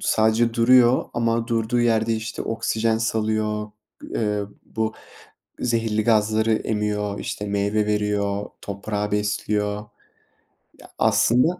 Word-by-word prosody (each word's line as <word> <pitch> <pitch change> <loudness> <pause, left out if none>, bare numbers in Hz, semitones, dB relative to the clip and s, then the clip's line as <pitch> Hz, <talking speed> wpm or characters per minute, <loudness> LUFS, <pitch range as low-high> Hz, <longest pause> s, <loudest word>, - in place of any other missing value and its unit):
sadece 110 +1 +2
duruyor 120 +1 +5
ama 115 -1 0
durduğu 115 +1 +1
yerde, 115 -1 +2
işte, 110 +1 -4
oksijen 110 0 0
salıyor, 110 -1 -1 0.4
eee, 105 -2 0 0.2
bu 110 -1 -3 0.7
zehirli 115 -3 0
gazları 110 0 +2
emiyor, 105 -2 -1
işte, 105 - -4
meyve 100 +1 0
veriyor, 105 -1 0 0.2
toprağı 105 +1 -3
besliyor. 105 0 0 1.1
Ya, - - -15
aslında 125 +10 +3
110 Hz, 105 wpm, -23 LUFS, 105-115 Hz, 1.1 s, duruyor